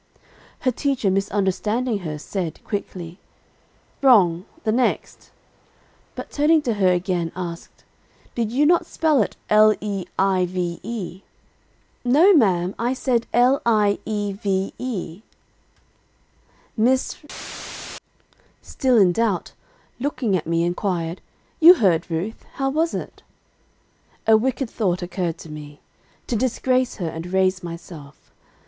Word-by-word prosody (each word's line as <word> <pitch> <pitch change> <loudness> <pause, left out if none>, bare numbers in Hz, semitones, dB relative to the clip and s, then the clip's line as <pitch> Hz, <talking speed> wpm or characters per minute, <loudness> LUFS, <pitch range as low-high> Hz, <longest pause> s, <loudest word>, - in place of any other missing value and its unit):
'_ - - -37 0.4
Her 255 - +2
teacher 260 -5 0
misunderstanding 205 +4 0
her 155 -5 -5
said, 170 +1 -4
quickly, 180 -4 -5 0.8
'Wrong 190 -10 +5 0.2
the 220 - +1
next;' 245 +3 -1 0.9
but - - -7
turning 305 +1 +3
to 240 - 0
her 190 -3 +3
again, 175 -2 -1
asked, 170 -2 -7 0.5
'Did 230 -2 -2
you 280 +5 +2
not 345 +3 +3
spell 310 -6 +2
it 205 - -2
l 215 0 +6
e 200 -3 -3
i 190 -1 +2
v 175 -1 -3
e?' 195 -5 -6 0.8
"'No 300 +11 +5
ma'am, 190 - +3
I 240 +2 0
said 250 -3 0
l 250 +3 +4
i 210 -3 +2
e 205 -2 -2
v 195 -1 -2
e,' 205 -7 -5 1.5
"Miss 255 +4 +1 0.7
R, - - -10 0.6
still 255 -2 +1
in 190 -4 +6
doubt, 205 -2 -1 0.5
looking 245 -6 -1
at 165 -3 -2
me, 165 0 +1
inquired, 175 -1 -2 0.4
'You 340 +3 +10
heard, 185 - +2
Ruth; 175 +7 -4
how 270 0 -1
was 320 +3 0
it?' - - -7 1.0
"A 220 - +6
wicked 260 +3 0
thought 185 -6 -1
occurred 175 -2 -3
to 160 - -11
me, 150 -1 -10 0.5
to 240 - -2
disgrace 255 +2 +1
her, 175 - -3
and 165 +2 -7
raise 185 0 +2
myself. 165 -4 -10
205 Hz, 130 wpm, -22 LUFS, 180-245 Hz, 1.5 s, You